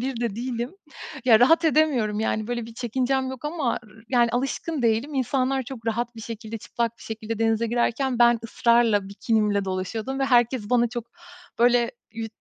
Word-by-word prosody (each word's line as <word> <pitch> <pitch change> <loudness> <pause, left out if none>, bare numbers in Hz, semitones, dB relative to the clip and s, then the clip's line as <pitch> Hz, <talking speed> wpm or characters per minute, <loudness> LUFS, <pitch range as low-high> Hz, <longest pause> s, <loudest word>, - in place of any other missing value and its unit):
biri 250 -1 -3
de 225 -3 -2
değilim. 240 0 -3 0.5
Ya, 230 -2 +6
rahat 325 +6 +5
edemiyorum 265 -10 +2
yani, 215 -1 -1
böyle, 240 -1 -3
bir 230 - -12
çekincem 260 +2 -1
yok 260 +2 -8
ama 295 -5 -1
r - - -18 0.2
yani, 240 -2 +3
alışkın 270 +3 -2
değilim. 235 +6 +1
İnsanlar 265 +1 0
çok 235 -2 -9
rahat 235 +1 -2
bir - - -8
şekilde, 225 -1 -6
çıplak 235 +2 -3
bir - - -14
şekilde 220 0 -5
denize 225 0 +1
girerken 240 +2 0
ben 240 0 +5
ısrarla 230 -4 +2
bikinimle 210 -1 0
dolaşıyordum 215 +8 -3
ve 270 - +1
herkes 240 -3 +2
bana 240 -1 +3
çok, 240 -1 -5 0.5
böyle, 240 0 +4 0.2
yu 225 0 -4
235 Hz, 175 wpm, -24 LUFS, 225-260 Hz, 0.5 s, Ya